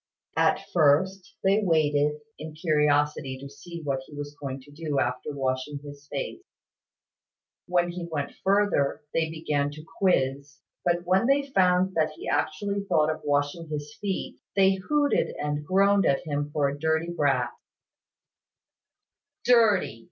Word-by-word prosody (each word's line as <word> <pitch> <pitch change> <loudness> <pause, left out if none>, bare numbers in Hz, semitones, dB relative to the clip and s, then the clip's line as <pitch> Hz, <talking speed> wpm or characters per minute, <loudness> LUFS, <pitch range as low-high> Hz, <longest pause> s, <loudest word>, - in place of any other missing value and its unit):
At - - +2
first, 180 +5 +2
they 195 +2 +4
waited, 150 -4 +2 0.2
in 155 0 -7
curiosity 150 -4 +1
to 140 - -8
see 170 +5 -9
what 140 -2 -1
he 150 - -12
was 145 0 -6
going 135 -1 -4
to 145 +2 -17
do 145 -2 -2
after 125 +3 -1
washing 135 +1 -2
his 145 0 -11
face; - - -4 1.3
when 175 -1 +1
he 175 -1 -6
went 145 -2 -3
further, 195 -9 +2
they 160 -1 +1
began 150 -3 -1
to 155 +2 -10
quiz; 140 -6 +1 0.3
but 175 0 +1
when 190 +6 +3
they 280 +1 +4
found 185 -2 +3
that 155 -2 +1
he - - -9
actually 195 +7 -1
thought 155 -5 +3
of 155 - -6
washing 145 +3 0
his 150 -1 -5
feet, 195 -2 -3 0.2
they 195 -1 +5
hooted 285 +10 +1
and 150 0 -2
groaned 195 +1 +4
at 135 - +2
him 145 -1 -2
for 145 -1 +1
a 140 +1 -4
dirty 160 +2 0
brat. 130 -6 +1 1.9
"Dirty!" 215 - +4
155 Hz, 145 wpm, -27 LUFS, 145-185 Hz, 1.9 s, they